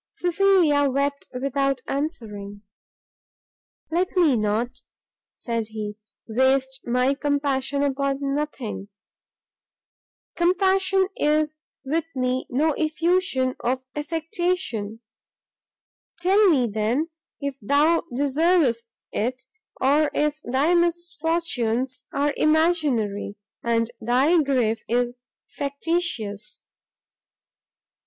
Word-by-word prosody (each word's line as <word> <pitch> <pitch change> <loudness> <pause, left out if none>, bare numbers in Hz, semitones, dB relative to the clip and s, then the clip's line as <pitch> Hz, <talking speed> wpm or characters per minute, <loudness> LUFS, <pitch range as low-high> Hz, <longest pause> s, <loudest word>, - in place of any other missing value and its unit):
Cecilia 350 -6 +3
wept 280 +1 -1
without 275 0 -1
answering. 210 - -4 1.3
"Let 360 +4 0
me 320 -7 +5
not," 230 +4 -1 0.5
said 230 -2 -3
he, 210 -1 -5 0.3
"waste 265 +3 +1
my 250 +3 +2
compassion 280 -1 0
upon 275 0 0 0.2
nothing; 265 -9 -4 1.5
compassion 380 +2 +2
is 305 +1 +1 0.2
with 310 +4 -1
me 255 0 -1
no 300 +5 +2
effusion 315 -4 +1
of 255 +2 -1
affectation; 315 - -2 1.2
tell 385 +4 +4
me, 270 -7 +4
then, 230 +9 -1 0.3
if 280 -2 -4
thou 290 +9 +3
deservest 275 -3 +1
it, 250 +4 -2 0.4
or 290 +3 +3
if 300 0 +1
thy 275 +7 +2
misfortunes 325 -8 0
are 285 +1 +1
imaginary, 300 -12 +1 0.3
and 230 0 0
thy 270 +9 +4
grief 245 -6 +1
is 245 +1 +1 0.3
factitious?" 280 - -3
275 Hz, 85 wpm, -24 LUFS, 245-320 Hz, 1.5 s, me